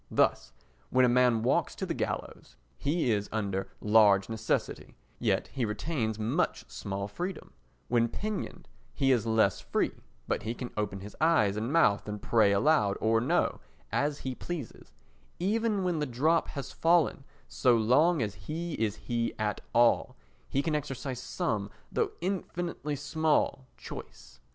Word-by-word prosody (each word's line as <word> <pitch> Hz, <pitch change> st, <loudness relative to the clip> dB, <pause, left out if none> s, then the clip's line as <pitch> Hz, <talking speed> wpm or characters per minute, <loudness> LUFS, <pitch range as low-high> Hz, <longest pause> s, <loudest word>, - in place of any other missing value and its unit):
Thus, -, -, +2 dB, 0.4 s
when 130 Hz, 0 st, +4 dB
a 120 Hz, 0 st, +3 dB
man 125 Hz, -3 st, +4 dB
walks 125 Hz, -, +1 dB
to -, -, -3 dB
the -, -, -2 dB
gallows, -, -, -4 dB, 0.2 s
he 145 Hz, -3 st, 0 dB
is 105 Hz, -1 st, 0 dB
under 100 Hz, -3 st, -2 dB
large 105 Hz, -2 st, +5 dB
necessity, 110 Hz, 0 st, -2 dB, 0.2 s
yet -, -, 0 dB
he 130 Hz, -, -3 dB
retains 110 Hz, +1 st, -2 dB
much 110 Hz, +1 st, -1 dB
small 100 Hz, 0 st, -4 dB
freedom; 175 Hz, -, -6 dB, 0.3 s
when 120 Hz, -1 st, +3 dB
pinioned, 210 Hz, -, -5 dB, 0.3 s
he 135 Hz, -1 st, +3 dB
is 115 Hz, -3 st, +2 dB
less 110 Hz, -1 st, +3 dB
free, -, -, 0 dB, 0.4 s
but -, -, 0 dB
he 115 Hz, +3 st, -3 dB
can 125 Hz, -1 st, -6 dB
open 100 Hz, -2 st, -2 dB
his 105 Hz, +2 st, -9 dB
eyes 130 Hz, -12 st, +4 dB
and 110 Hz, +4 st, -2 dB
mouth 105 Hz, -11 st, +3 dB
and 105 Hz, 0 st, -4 dB
pray 110 Hz, -1 st, +3 dB
aloud 105 Hz, -2 st, +3 dB
or 115 Hz, 0 st, +2 dB
no 120 Hz, -, +1 dB, 0.3 s
as 145 Hz, 0 st, 0 dB
he 130 Hz, -, -1 dB
pleases; 155 Hz, -1 st, -7 dB, 0.5 s
even 210 Hz, +2 st, 0 dB
when 175 Hz, -3 st, 0 dB
the 150 Hz, -, -1 dB
drop 155 Hz, +7 st, +2 dB
has 140 Hz, -2 st, -6 dB
fallen, 165 Hz, -4 st, +2 dB, 0.2 s
so 125 Hz, -2 st, +3 dB
long 135 Hz, +7 st, +4 dB
as 105 Hz, -2 st, -3 dB
he 165 Hz, +8 st, -5 dB
is 105 Hz, -2 st, +1 dB
"he" 120 Hz, -1 st, -1 dB
at 105 Hz, -2 st, -1 dB
all, 120 Hz, 0 st, +3 dB, 0.3 s
he 140 Hz, -, 0 dB
can 160 Hz, -, -1 dB
exercise 135 Hz, -3 st, -3 dB
some, 110 Hz, -, -2 dB, 0.2 s
though -, -, 0 dB
infinitely 175 Hz, -4 st, -3 dB
small, 150 Hz, -2 st, 0 dB
choice. -, -, -10 dB
125 Hz, 155 wpm, -30 LUFS, 110-155 Hz, 0.5 s, large